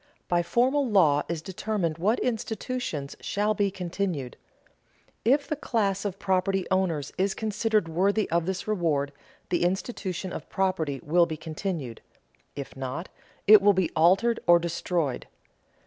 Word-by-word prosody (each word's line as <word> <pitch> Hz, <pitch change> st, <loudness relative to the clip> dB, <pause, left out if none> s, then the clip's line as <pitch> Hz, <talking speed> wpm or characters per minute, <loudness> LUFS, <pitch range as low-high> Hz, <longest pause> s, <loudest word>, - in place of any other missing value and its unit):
By 175 Hz, -1 st, +2 dB
formal 255 Hz, +9 st, +1 dB
law 160 Hz, -9 st, +4 dB
is 165 Hz, -2 st, -3 dB
determined 185 Hz, -4 st, -2 dB
what 210 Hz, +7 st, +2 dB
institutions 225 Hz, -, -3 dB
shall 210 Hz, +1 st, 0 dB
be 205 Hz, -1 st, +1 dB
continued. 180 Hz, -7 st, -3 dB, 0.9 s
If 275 Hz, +6 st, +3 dB
the 305 Hz, -, -1 dB
class 205 Hz, -8 st, -1 dB
of 195 Hz, -2 st, -3 dB
property 190 Hz, 0 st, 0 dB
owners 170 Hz, -7 st, 0 dB
is 190 Hz, 0 st, +1 dB
considered 215 Hz, -2 st, 0 dB
worthy 195 Hz, +6 st, +1 dB
of 170 Hz, 0 st, +1 dB
this 190 Hz, +1 st, -3 dB
reward, 160 Hz, -9 st, 0 dB, 0.4 s
the 175 Hz, -, +1 dB
institution 185 Hz, 0 st, -2 dB
of -, -, -7 dB
property 170 Hz, -8 st, -1 dB
will 170 Hz, +3 st, +3 dB
be 155 Hz, -, -5 dB
continued; 155 Hz, -, -5 dB, 0.5 s
if 140 Hz, -1 st, -7 dB
not, 135 Hz, +6 st, -5 dB, 0.4 s
it 210 Hz, 0 st, +9 dB
will 205 Hz, +1 st, +5 dB
be 185 Hz, -3 st, 0 dB
altered 195 Hz, +8 st, +4 dB
or 175 Hz, 0 st, +8 dB
destroyed. 170 Hz, -4 st, -2 dB
185 Hz, 140 wpm, -27 LUFS, 165-205 Hz, 0.9 s, it